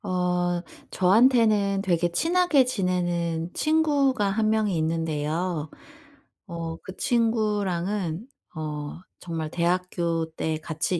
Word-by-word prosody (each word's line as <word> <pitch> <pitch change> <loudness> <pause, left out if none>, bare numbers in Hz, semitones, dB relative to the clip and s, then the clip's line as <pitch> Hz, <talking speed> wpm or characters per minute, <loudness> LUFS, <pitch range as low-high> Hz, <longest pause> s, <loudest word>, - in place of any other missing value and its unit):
어. 180 -1 0 0.3
저한테는 210 -1 +4
되게 175 -2 +1
친하게 330 - +3
지내는 175 -6 -1
친구가 290 -7 +2
1 215 +2 +1
명이 215 -3 +1
있는데요. 160 0 -1 0.8
어 165 -2 -5
그 190 - -9
친구랑은 210 -5 0 0.3
어 150 -1 -5 0.2
정말 165 -3 -4
대학교 170 -1 0
때 160 0 -2
같이 160 +3 -2
180 Hz, 200 characters per minute, -25 LUFS, 165-215 Hz, 0.8 s, 저한테는